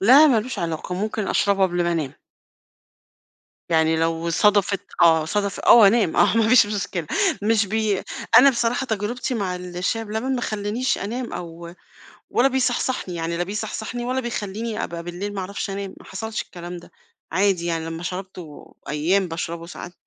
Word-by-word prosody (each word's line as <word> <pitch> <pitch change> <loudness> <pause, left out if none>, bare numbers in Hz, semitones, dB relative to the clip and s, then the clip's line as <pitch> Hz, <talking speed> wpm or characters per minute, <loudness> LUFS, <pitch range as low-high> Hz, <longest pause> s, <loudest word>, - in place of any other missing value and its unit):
لا 265 +10 +8
ما 235 -6 +4
لوش 255 +4 -6
علاقة، 170 +1 -3
ممكن 210 +1 -2
أشربه 200 -1 +2
قبل 175 -1 +2
ما 175 - +1
أنام. 150 -5 -2 1.6
يعني 160 -1 +3
لو 165 +1 0
صدفت، 200 +1 +3 0.2
آه، 160 -2 +5
صدف 200 +3 -2
آه - - +6
وأنام، 215 -4 +5
آه 230 - +4
ما 220 -1 +3
فيش 230 -3 +6
مشكلة 195 -5 -3 0.4
مش 215 -1 +2
بي 215 -1 0 0.4
أنا 275 +3 +8
بصراحة 240 +1 0
تجربتي 230 +4 -2
مع 190 -5 -2
الشاي 180 +5 -3
بلبن، 220 +5 -2
ما 245 - -1
خلانيش 215 +3 -1
أنام 235 +4 -4
أو 170 0 -7 0.6
ولا 255 +3 +3
بيصحصحني 260 -6 -1
يعني، 170 0 -3
لا 175 - 0
بيصحصحني 220 +4 -4
ولا 255 +1 -1
بيخليني 225 -2 -4
أبقى 170 0 -5
بالليل 180 +4 -5
ما 200 - -4
أعرفش 200 +1 -4
أنام، 195 0 -5
ما - - -16
حصلش 220 +3 -4
الكلام 175 0 -8
ده، 170 - -14 0.4
عادي 190 -3 +1
يعني 165 -1 -2
لمّا 165 +1 -6
شربته، 180 -3 -8
أيام 175 +6 +1
باشربه 165 0 -5
ساعات 175 +1 -9
200 Hz, 165 wpm, -23 LUFS, 170-220 Hz, 1.6 s, لا